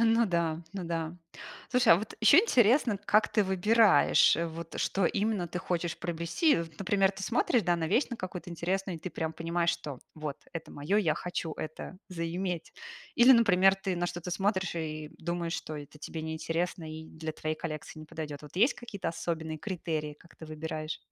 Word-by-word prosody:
А, 230 - +5
ну 230 +1 +4
да, 170 -3 0
ну 195 - -4
да. 165 -1 -3 0.6
Слушай, 250 -6 +6
а - - +7
вот 215 +4 -5
ещё 225 +8 +8
интересно, 250 - +4
как 210 +1 +4
ты 210 - +3
выбираешь, 205 +3 +5 0.2
вот 165 0 -6
что 195 -2 +1
именно 205 -2 0
ты 175 +1 -4
хочешь 175 -2 -2
приобрести. 170 - +1
Вот, 165 -2 -6
например, 195 0 +2
ты 190 -1 -9
смотришь, 235 +1 +2
да, 175 0 +2
на 165 -1 -1
вещь 230 - +3
на 240 - -3
какую-то 185 -2 -6
интересную, 180 +2 -2
и - - -9
ты 180 +2 -5
прям 160 0 -3
понимаешь, 170 +1 0
что 140 -4 -5 0.2
вот 150 -3 -5 0.2
это 165 - -6
моё, 145 +8 -1
я 165 -7 +2
хочу 175 -2 -4
это 155 +4 -7
заиметь. 175 0 -3 0.4
Или, 245 +2 +8
например, 195 -5 +5
ты 195 -1 -3
на 175 0 0
что-то 175 0 -5
смотришь 190 0 0
и 155 -2 -4
думаешь, 170 0 -3
что 155 - -7
это 145 +1 -10
тебе 160 +1 -6
неинтересно 165 +2 -2
и 160 0 -7
для 160 0 -6
твоей 155 0 -3
коллекции 155 -1 -6
не 155 - -10
подойдет. 150 -3 -6
Вот 150 +4 -13
есть 235 +8 +4
какие-то 235 -5 -5
особенные 160 -1 -3
критерии, 160 -5 -3
как 170 +3 -20
ты 160 - -10
выбираешь? 155 0 -5
175 Hz, 190 wpm, -30 LUFS, 160-195 Hz, 0.6 s, ещё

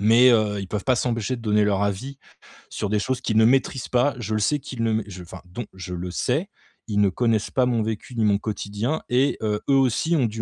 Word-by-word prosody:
Mais, 115 +5 +6
heu, 105 -3 +2
ils 95 - -5
peuvent 100 +1 -4
pas 130 - +3
s'empêcher 120 0 -1
de - - -10
donner 105 -1 +2
leur 100 -1 +1
avis 120 +8 -4 0.5
sur 105 - -3
des 105 - +2
choses 130 +5 -2
qu'ils 110 - 0
ne 110 - +6
maîtrisent 130 0 +2
pas. 125 +3 +2
Je 110 -2 -2
le - - +1
sais 145 +8 +1
qu'ils 125 -4 -5
ne 115 - +1
mai 110 -1 0
je 90 -3 -9
enfin 85 - -11
dont, 100 +7 -7
je 95 -1 -7
le 90 +1 -5
sais, 145 - -1 0.4
ils 105 -2 +1
ne 100 - +4
connaissent 110 +1 0
pas 130 - +2
mon 120 -3 +1
vécu 110 +3 -4
ni 115 - +1
mon 105 -1 +3
quotidien 105 +6 -3
et 130 +3 +2
heu, 105 -1 0
eux 140 - +3
aussi, 135 +5 +2
ont 135 -6 +2
du 110 +1 -5
110 Hz, 255 wpm, -23 LUFS, 105-125 Hz, 0.5 s, Mais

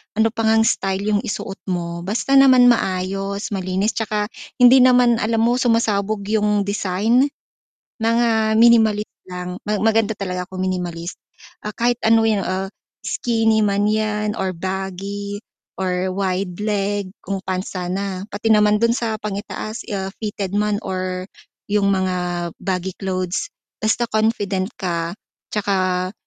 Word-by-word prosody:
ano 220 +1 +3
pa 225 -1 -1
ngang 220 0 +4
style 195 -3 0
yung 205 - +3
isuot 200 -1 -5
mo 170 -2 -3
basta 270 +6 +3
naman 255 -2 +7
maayos, 195 0 -2
malinis, 190 +2 0
tsaka 210 -1 -2 0.2
hindi 250 +1 +7
naman 250 -2 +5
alam 225 0 +1
mo 240 +2 +2
sumasabog 215 -4 +1
yung 210 -2 +2
design, 205 +6 +1 0.7
mga 225 -1 +2
minimalist 220 -2 +4 0.2
lang, 180 0 -6
ma 210 - 0
maganda 220 0 +2
talaga 180 -2 -4
kung 185 0 -5
minimalist. 175 -2 -3 0.5
Ah, 210 - -4
kahit 240 0 +1
ano 225 0 +5
yun, 215 -3 +1
ah, 190 +1 -2 0.3
skinny 225 -2 +1
man 205 +1 +1
yan, 215 0 -1
or 190 -1 -1
baggy, 195 +3 -4 0.4
or 185 0 -1
wide 185 -1 -1
leg 205 -2 -1 0.2
kung 195 -1 -3
pants 185 0 -4
sana, 185 +1 -3
pati 220 +2 +2
naman 210 0 +4
dun 230 +1 +2
sa 225 -3 -2
pang 210 -1 -4
i-taas, 215 +1 -5
ah, 195 -1 -3
fitted 205 -2 -3
man 210 0 +1
or 185 0 -3 0.4
yung 200 -1 +2
mga 180 -2 -1
baggy 185 -1 -2
clothes, 185 - -2 0.3
basta 225 +2 +1
confident 215 -3 0
ka 170 -3 -2 0.4
tsaka 185 -3 0
205 Hz, 140 wpm, -21 LUFS, 185-220 Hz, 0.7 s, naman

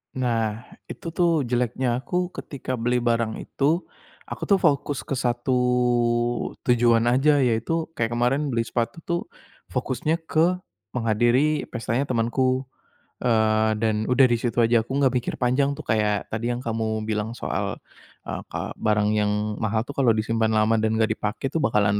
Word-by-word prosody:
Nah, 115 -4 0 0.3
itu - - -8
tuh 165 -7 +2
jeleknya 125 +1 0
aku. 180 +3 -1
Ketika 130 -2 -5
beli 120 +1 0
barang 115 -2 0
itu, 155 +6 0 0.4
aku - - -6
tuh 200 -3 +3
fokus 140 -7 0
ke - - -1
1 125 0 0 1.1
tujuan 120 -1 +4
aja, 140 +4 +4
yaitu 130 +6 0
kayak 115 0 -1
kemarin 130 +5 +1
beli 115 -1 0
sepatu 120 +7 -2
tuh 170 0 0 0.5
fokusnya 160 +2 -1
ke 175 +3 +2 0.3
menghadiri 120 +6 +2
pestanya 120 +2 -1
temanku, 130 +1 0 0.6
eee, 110 -2 +3
dan 110 -1 +1
udah 130 +1 +5
di 120 - +2
situ 120 0 -3
aja, 115 -1 +4
aku 130 +4 -2
enggak 135 -2 +3
mikir 125 - -1
panjang 130 +3 +2
tuh - - -8
kayak 105 -2 +1
tadi 115 +2 -1
yang 120 - -3
kamu 110 -1 -1
bilang 110 0 -2
soal, - - -3 0.5
eee, - - -4
ka - - -4
barang 105 -1 +1
yang 105 0 0
mahal 110 0 0
tuh 140 - -7
kalau 130 -4 +4
disimpan 110 +1 0
lama 110 +1 +3
dan 110 0 +1
enggak 110 0 +2
dipakai 105 +6 -3
tuh 165 - +1
bakalan 105 -4 +2
120 Hz, 160 wpm, -24 LUFS, 110-135 Hz, 1.1 s, udah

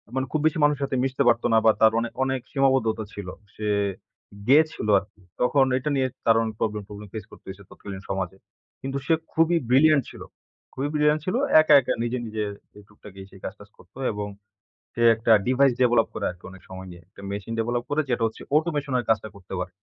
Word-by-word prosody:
মানে 130 - 0
খুব 155 - 0
বেশি 155 0 +2
মানুষের 145 -1 +2
সাথে 135 -1 -2
মিশতে 135 +1 0
পারতো 120 0 +3
না - - +6
বা 110 - +8
তার 110 - +7
অনেক-অনেক 130 +3 -2
সীমাবদ্ধতা 130 -5 +1
ছিল। 100 -3 -7 0.3
সে 105 - -4 0.8
গেয়েছিল 155 -4 +3
আরকি 100 +1 -18 0.2
তখন 135 +2 +4
এটা 140 +4 -3
নিয়ে 130 -1 +1 0.2
তার 115 -1 +5
অনেক 110 -1 -4
প্রবলেম 105 -2 -2
প্রবলেম 105 0 -10
ফেস 110 -1 -6
করতেছে 95 +1 -11
তৎকালীন 95 -1 -9
সমাজে। 95 -1 -3 0.4
কিন্তু 135 +1 -3
সে 165 - +3 0.2
খুবই 165 +1 +3
ব্রিলিয়ান্ট 140 +2 +5
ছিল - - -12 0.5
খুবই 135 +2 -3
ব্রিলিয়ান্ট 150 0 +2
ছিল। 185 - -1 0.3
একা, 155 - +4
একা 120 - -1
নিজে, 120 +2 -2
নিজে 110 -1 -3 0.4
টুকটাকি 105 -2 -15
সেই 95 - -15
কাজ 95 - -4
টাজ 105 - -14
করত - - -21 0.2
এবং 105 0 -4 0.7
সে 120 - -2
একটা 115 +1 +2
Device 130 +1 +3
Develop 120 -2 +4
করে - - -4
আরকি 90 0 -14
অনেক 95 0 -14
সময় 95 0 -9
নিয়ে। 85 -1 -12
একটা 100 0 -15
মেশিন 100 +3 -5
Develop 120 +1 -1
করে 145 +1 +1
যেটা 120 -1 0
হচ্ছে 110 - -7
Automation 150 -4 -1
এর 120 - -2
কাজটা 110 -1 +1
করতে 95 -1 -10
পারে। 90 0 -5
120 Hz, 195 wpm, -24 LUFS, 105-135 Hz, 0.8 s, বা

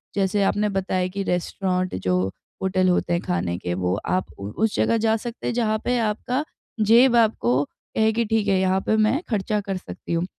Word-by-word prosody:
जैसे 200 0 +1
आपने 210 +2 +1
बताया 190 -2 -1
कि 195 +2 -4
रेस्टोरेंट 185 +1 -1
जो 90 0 +2 0.5
होटल 185 -1 +2
होते 180 -1 +1
हैं 170 - +1
खाने 85 0 -2
के 90 -1 -3
वो 90 0 -1 0.2
आप 185 0 +1
उ 100 +1 -5
उस 220 - +1
जगह 230 - +2
जा 220 0 +2
सकते 235 +1 -6
हैं - - 0
जहाँ 220 -2 +1
पे 245 0 +1
आपका 230 +5 -1 0.4
जेब 240 +2 +6
आपको 145 - +3
कहे 220 +8 -1
कि 235 +1 0
ठीक 215 -1 0
है, 190 -1 +3
यहाँ 190 0 +2
पे 220 - +3
मैं 220 +9 +2
खर्चा 210 -1 0
कर 195 -1 -3
सकती 180 - -7
हूँ। 170 +1 0
195 Hz, 200 wpm, -23 LUFS, 180-220 Hz, 0.5 s, जेब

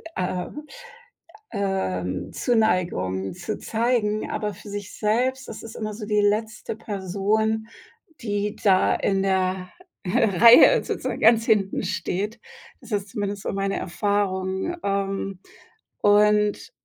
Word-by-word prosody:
äh, 180 0 -2 1.1
ähm, 95 - -2
Zuneigung 175 - 0
zu 180 +4 -5
zeigen, 220 -2 0
aber 210 -1 -2
für 205 +2 -13
sich 205 -1 -6
selbst 255 +5 0
das 220 - -8
ist 225 - -9
immer 215 -1 -4
so 210 0 -7
die 210 0 +1
letzte 215 +1 -1
Person, 215 +2 -1 0.5
die 205 -1 -2
da 190 -2 +4
in 195 -1 0
der 185 -1 0 0.4
Reihe 230 - +6
sozusagen - - -3
ganz 225 0 +5
hinten 205 -4 +1
steht. 205 +5 -3 0.4
Das 240 -3 -13
ist 205 -1 -1
zumindest 205 -1 -4
so - - -3
meine 195 0 -1
Erfahrung, 190 - -1
ähm, 195 -1 -2 0.6
und 210 0 +3
205 Hz, 120 wpm, -24 LUFS, 190-220 Hz, 1.1 s, Reihe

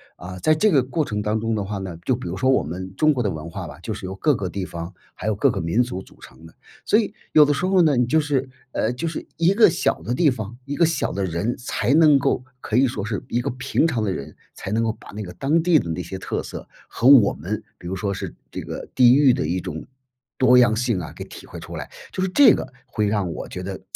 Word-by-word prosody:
啊， 90 +1 -9
在 155 +11 +3
这 215 +7 +3
个 140 -6 +5
过 135 +5 -1
程 105 -6 -3
当 105 +1 0
中 115 0 -1
的 105 -2 -2
话 100 0 -4
呢， 95 -3 -6
就 - - +2
比 85 - -6
如 95 - -4
说 130 - +1
我 130 - +3
们 95 +5 -7
中 155 +6 +4
国 130 - -1
的 105 - 0
文 80 -1 -6
化 90 0 -6
吧， 75 +2 -11
就 110 - -4
是 100 -2 -7
由 95 - -5
各 145 +8 +2
个 100 -4 -3
地 95 +2 -4
方 85 0 -7 0.2
还 105 - -6
有 110 - +1
各 125 +6 +3
个 - - -3
民 85 +10 +1
族 120 -6 -5
组 - - -18
成 80 - -15
的。 80 - -14 0.3
所 210 - +4
以 215 -2 0 0.2
有 150 - +8
的 145 - +3
时 160 +6 -1
候 185 -1 +4
呢， 150 -5 +3
你 125 - +3
就 155 +6 +2
是 140 -3 -1 0.2
呃， 120 0 -1
就 145 +7 -4
是 160 - -4
一 170 +3 +3
个 215 -1 +6
小 170 - +1
的 120 - -3
地 150 +3 +3
方， 115 -2 -5
一 140 +2 -5
个 170 - +5
小 165 - -1
的 100 -1 -2
人 90 +7 -2
才 125 +1 -1
能 155 -3 +6
够， 125 -1 0 0.2
可 110 - -1
以 130 +1 +5
说 105 -4 -4
是 105 -3 -3
一 120 - -1
个 - - -2
平 125 +5 0
常 130 -9 0
的 100 -3 0
人， 70 - -7 0.2
才 100 - -7
能 115 +2 +1
够 115 -1 0
把 - - -16
那 105 - -6
个 90 - -8
当 150 - +1
地 175 -1 +4
的 85 - -2
那 80 +2 -2
些 90 +3 -6
特 - - -3
色 - - -9 0.2
和 120 - -5
我 130 -7 +7
们， 100 +8 -4 0.2
比 - - -15
如 90 - -4
说 100 +1 -2
是 - - -6 0.2
这 - - -6
个 - - -7
地 125 -1 +7
域 140 -3 +5
的 - - -1
一 85 +4 -1
种 85 -4 -6 0.5
多 125 -1 +5
样 120 -3 +5
性 115 -4 0
啊， 80 - -7
给 - - -8
体 - - -12
会 85 - -10
出 85 +1 -9
来。 75 - -6 0.2
就 185 - -2
是 190 - 0
这 285 +8 +7
个 130 - -4
会 105 -4 -1
让 100 -5 -1
我 - - -7
觉 90 - -6
得 95 0 -6
110 Hz, 305 characters per minute, -22 LUFS, 95-140 Hz, 0.5 s, 有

